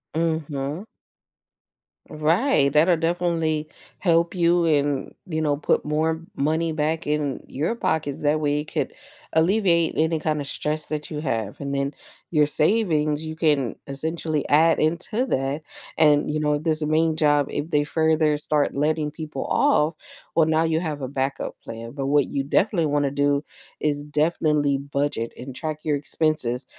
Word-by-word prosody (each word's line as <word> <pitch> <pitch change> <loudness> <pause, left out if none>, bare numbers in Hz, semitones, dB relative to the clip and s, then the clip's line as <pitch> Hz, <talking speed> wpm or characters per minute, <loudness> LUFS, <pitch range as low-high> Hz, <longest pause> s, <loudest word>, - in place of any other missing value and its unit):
Mhm. 160 +1 -2 1.2
Right, 155 - +2
that'll 165 +3 +5
definitely 165 -2 0 0.3
help 170 -1 +2
you 175 -1 +3
and, 145 -3 +1
you 160 -2 -2
know, 145 -2 +1
put 150 - +1
more 160 +2 0 0.2
money 160 +3 0
back 155 +1 -1
in 150 -2 -1
your 155 - -2
pockets, 155 -10 -1
that 150 +1 +2
way 145 0 +1
it 150 - -11
could - - -1 0.4
alleviate 170 0 +3
any 160 0 +1
kinda 150 -2 -1
stress 150 +2 -3
that 150 +1 -4
you 150 - -3
have, 115 -8 -3
and 140 0 -3
then 140 +1 -1 0.4
your 150 -2 +4
savings, 155 -3 +1
you 160 0 -5
can 145 -7 +1
essentially 155 +2 -3
add 160 +3 +5
into 175 +10 0
that 135 - -1 0.4
and, 150 -1 +4
you 155 - 0
know, 150 -1 +1
this 155 0 -1
main 155 +1 +2
job, 145 -2 +3
if 145 +3 -3
they 145 -2 +2
further 155 -1 +2
start 150 0 0
letting 150 +1 0
people 155 0 -6
off, 165 - +2 0.4
well, 160 -2 +4
now 160 0 +3
you 160 0 +1
have 155 -4 -4
a 130 - -2
backup 135 0 -3
plan, 115 +1 -7
but 135 -1 -4
what 145 -1 +3
you 140 -1 -2
definitely 170 +2 +1
wanna 145 -1 +1
do, 145 +1 +1 0.4
is 145 -1 0
definitely 150 -1 +1
budget 140 -4 -2
and 130 +1 -8
track 155 0 -4
your 150 -2 +1
expenses 145 -4 -1
150 Hz, 155 wpm, -24 LUFS, 145-160 Hz, 1.2 s, that'll